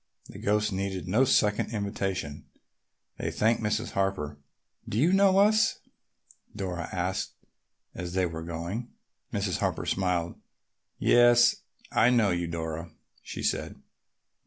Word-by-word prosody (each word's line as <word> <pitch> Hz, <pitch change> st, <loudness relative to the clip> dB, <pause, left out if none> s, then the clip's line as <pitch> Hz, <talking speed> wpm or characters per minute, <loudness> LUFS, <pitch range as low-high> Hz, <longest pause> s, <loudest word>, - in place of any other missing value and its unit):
The -, -, -10 dB
ghosts 105 Hz, +1 st, +1 dB
needed 95 Hz, -1 st, -3 dB
no 110 Hz, +9 st, +3 dB
second 105 Hz, -3 st, +2 dB
invitation. 95 Hz, -7 st, -3 dB, 0.7 s
They -, -, -1 dB
thanked 115 Hz, +2 st, +1 dB
Mrs. 105 Hz, -1 st, -1 dB
Harper. 95 Hz, -7 st, -2 dB, 0.5 s
"Do 105 Hz, -, -2 dB
you 160 Hz, +10 st, +4 dB
know 195 Hz, -1 st, +5 dB
us?" 215 Hz, +2 st, +4 dB, 0.8 s
Dora 90 Hz, -4 st, -4 dB
asked 90 Hz, +1 st, -2 dB, 0.6 s
as 90 Hz, -1 st, -6 dB
they 95 Hz, -1 st, +2 dB
were 80 Hz, -2 st, -5 dB
going. 85 Hz, +8 st, -5 dB, 0.4 s
Mrs. -, -, -1 dB
Harper -, -, -1 dB
smiled. 90 Hz, -3 st, -1 dB, 0.6 s
"Yes, 120 Hz, 0 st, +5 dB, 0.3 s
I 120 Hz, -, +4 dB
know 115 Hz, -5 st, +3 dB
you, 85 Hz, -1 st, -1 dB
Dora," 80 Hz, 0 st, -4 dB, 0.3 s
she -, -, -7 dB
said. -, -, -2 dB
95 Hz, 125 wpm, -28 LUFS, 85-115 Hz, 0.8 s, know